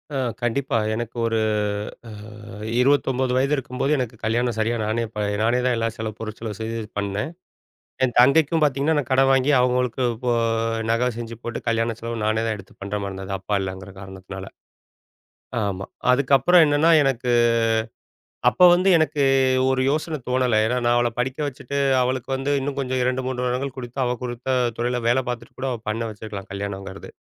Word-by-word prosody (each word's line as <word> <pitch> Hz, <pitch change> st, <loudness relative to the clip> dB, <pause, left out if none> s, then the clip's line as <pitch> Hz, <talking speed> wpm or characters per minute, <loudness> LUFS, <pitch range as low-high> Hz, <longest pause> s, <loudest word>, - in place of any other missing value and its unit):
அ -, -, 0 dB, 0.2 s
கண்டிப்பா! 120 Hz, +1 st, 0 dB, 0.2 s
எனக்கு 120 Hz, +1 st, -5 dB
ஒரு 115 Hz, -1 st, +1 dB, 0.7 s
அ -, -, -9 dB, 0.7 s
29 130 Hz, -2 st, +2 dB
வயது 140 Hz, +3 st, +2 dB
இருக்கும்போது 135 Hz, +1 st, -2 dB
எனக்கு 120 Hz, -3 st, -3 dB
கல்யாணம் 120 Hz, +1 st, 0 dB
சரியா 115 Hz, +2 st, +1 dB
நானே 110 Hz, +2 st, -1 dB
இப்ப 105 Hz, -1 st, -4 dB, 0.2 s
நானே 120 Hz, +3 st, +2 dB
தான் 125 Hz, -, +2 dB
எல்லா 115 Hz, 0 st, 0 dB
செலவு 110 Hz, -1 st, -5 dB
பொருட் 110 Hz, -1 st, -6 dB
செலவு 110 Hz, -3 st, -5 dB
செய்து 115 Hz, +1 st, -3 dB, 0.2 s
பண்ணேன். 105 Hz, +9 st, -2 dB, 0.7 s
என் 125 Hz, -, -1 dB
தங்கைக்கும் 155 Hz, +4 st, +4 dB
பார்த்தீங்கன்னா, 145 Hz, +2 st, +2 dB
நான் 135 Hz, -, -2 dB
கடன் 135 Hz, +1 st, +4 dB
வாங்கி 135 Hz, +2 st, +3 dB
அவங்களுக்கு 125 Hz, 0 st, +1 dB
இப்போ 120 Hz, +1 st, -1 dB, 0.6 s
நகை 120 Hz, +2 st, +2 dB
செஞ்சு 115 Hz, 0 st, -6 dB
போட்டு 120 Hz, -1 st, -4 dB
கல்யாண 115 Hz, 0 st, 0 dB
செலவு 115 Hz, 0 st, -4 dB
நானே 110 Hz, +1 st, +1 dB
தான் 110 Hz, -1 st, -1 dB
எடுத்து 100 Hz, -1 st, -14 dB
பண்ணுற 100 Hz, +1 st, -3 dB
மாரி 100 Hz, -, -3 dB
இருந்தது. 95 Hz, 0 st, -5 dB
அப்பா 100 Hz, +2 st, -3 dB
இல்லங்குற 95 Hz, 0 st, -6 dB
காரணத்தினால. 95 Hz, 0 st, -9 dB, 1.2 s
ஆமா. 100 Hz, -1 st, -3 dB, 0.3 s
அதுக்கப்புறம் 140 Hz, +6 st, +5 dB
என்னன்னா 150 Hz, +3 st, +3 dB
எனக்கு, 125 Hz, -2 st, 0 dB, 1.2 s
அப்ப -, -, -7 dB
வந்து 185 Hz, +2 st, +2 dB
எனக்கு 155 Hz, -3 st, +1 dB, 0.5 s
ஒரு 130 Hz, 0 st, +1 dB
யோசன 155 Hz, +1 st, -2 dB
தோணல. 125 Hz, -3 st, +2 dB
ஏன்னா, 125 Hz, +2 st, 0 dB
நான் 120 Hz, 0 st, +3 dB
அவள 120 Hz, 0 st, +2 dB
படிக்க 130 Hz, +3 st, -2 dB
வச்சுட்டு 140 Hz, +1 st, -4 dB, 0.2 s
அவளுக்கு 130 Hz, 0 st, -2 dB
வந்து 135 Hz, +2 st, -2 dB
இன்னும் 140 Hz, 0 st, -3 dB
கொஞ்சம் 130 Hz, -1 st, -1 dB
2 130 Hz, +1 st, 0 dB
3 125 Hz, -1 st, -2 dB
வருடங்கள் 130 Hz, +2 st, -2 dB
கொடுத்து 125 Hz, +1 st, -7 dB
அவள் 125 Hz, 0 st, -2 dB
கொடுத்த 125 Hz, +1 st, -2 dB, 0.2 s
துறைல 120 Hz, 0 st, 0 dB
வேலை 130 Hz, +2 st, +2 dB
பார்த்துட்டு 115 Hz, -1 st, -6 dB
கூட 135 Hz, -, -1 dB
அவ 120 Hz, -, -4 dB
பண்ண 115 Hz, +2 st, -2 dB
வச்சுருக்கலாம், 100 Hz, -2 st, -8 dB
கல்யாணங்கிறது. 100 Hz, -1 st, -6 dB
125 Hz, 165 wpm, -23 LUFS, 110-130 Hz, 1.2 s, அதுக்கப்புறம்